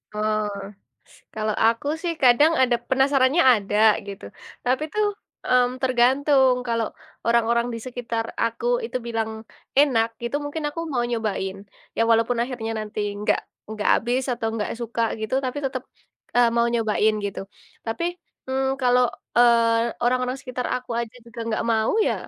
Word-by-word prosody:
Oh. 215 0 0 0.9
Kalau 215 -1 -1
aku 230 +4 +1 0.2
sih 345 -2 -1
kadang 265 +6 +6
ada 245 -2 +3
penasarannya 270 +3 +3
ada 205 -1 -2 0.3
gitu, 200 - -8 0.4
tapi 255 +4 +1
tuh, 425 0 +2 0.4
mmm, 250 0 +2
tergantung, 260 +1 +4
kalau 230 -1 0 0.4
orang-orang 235 0 +2
di - - -4
sekitar 235 -2 -3 0.2
aku 230 - -3 0.2
itu 355 - -3
bilang 225 -1 -2 0.5
enak 250 -6 +4
gitu, 235 +4 -1
mungkin 300 +2 -4
aku 295 +3 -5
mau 245 -2 +1
nyobain, 215 -5 -2 0.4
ya - - +2
walaupun 230 +1 +3
akhirnya 235 -3 -4
nanti 215 0 -5 0.2
nggak - - +2 0.3
nggak 215 -1 -2
habis 245 +3 0
atau 235 -2 -3
nggak 210 -2 -2
suka 235 0 -2 0.2
gitu, 220 +3 -2
tapi 255 +3 -2
tetep, 260 -2 -3 0.5
eee, 240 -1 +5
mau 235 0 +4
nyobain 220 -1 +2
gitu, 200 - -5 0.5
tapi, 225 +10 -2 0.5
mmm, 265 0 0 0.2
kalau, 250 0 +4 0.3
eee, 230 -1 +4
orang-orang 250 +1 +1
sekitar 255 -2 -4
aku 250 0 -5
aja 235 0 -6
juga 235 0 -9
gak - - -1
mau 220 0 +1
ya, - - +1
240 Hz, 150 wpm, -23 LUFS, 225-255 Hz, 0.9 s, kadang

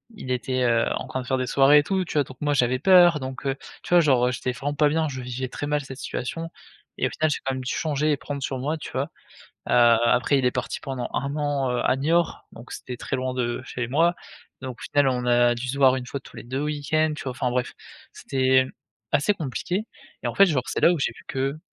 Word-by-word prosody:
il 165 -11 -9
était, 130 +1 -1
heu, 115 -1 +3
en - - -6
train 130 - -3
de - - -9
faire 130 - +1
des 130 - -2
soirées 140 +3 +6
et - - +1
tout, 190 +3 -1
tu - - -7
vois? 145 - +3
Donc 130 -2 -13
moi 145 -1 +1
j'avais 125 -2 +2
peur, 175 -1 +6
donc, 130 0 -7
heu, 135 - 0 0.3
tu - - -9
vois? 175 - +8
Genre, 130 -6 +3
heu, 125 - +1
j'étais 125 0 -2
vraiment 145 +3 -4
pas 150 0 +4
bien, 160 +1 +1
je 130 -2 -6
vivais 125 +1 -4
très 135 - -5
mal 150 0 0
cette 135 -1 -9
situation 165 +6 -4 0.5
et - - +2
au - - -4
final, 155 0 0
j'ai - - -1
quand 135 - 0
même 130 - -5
dû 125 - -2
changer 150 -1 0
et 145 - +1
prendre 140 0 -6
sur 130 -1 -3
moi, 150 +5 -2
tu - - -8
vois? 135 +4 -2 0.6
Heu, - - +2
après, 120 +3 +4
il 130 - 0
est 125 - +3
parti 125 -1 -3
pendant 130 -3 -5
1 140 +2 -2
an, 145 -3 0
heu, 125 - -1
à - - +3
Niort, 165 +5 0
donc 120 +2 -12
c'était 125 - -6
très 135 - -3
loin 130 0 -2
de 120 -1 -2
chez 120 -1 -4
moi. 165 +7 +2 0.5
Donc 130 -2 -6
au - - -10
final, 145 -1 +2
on 125 -1 -2
a 120 0 +4
dû 120 +2 -5
se 135 +2 -3
voir 130 -2 +5
1 125 - -6
fois 140 +2 -5
tous - - -15
les - - -8
2 130 +4 -3
week-ends, 150 +1 0
tu - - -7
vois? 130 - -3
Enfin 125 0 -2
bref, 125 0 -1 0.4
c'était, 130 -1 +1
hem, 130 0 -1 0.4
assez 155 +9 +3
compliqué 180 - -3 0.4
et - - -1
en - - -4
fait, 200 - +7
genre 145 -9 0
c'est - - -2
là 175 - +6
où 170 - -2
j'ai - - 0
vu - - -16
que 135 +3 -2
135 Hz, 270 wpm, -24 LUFS, 125-150 Hz, 0.6 s, vois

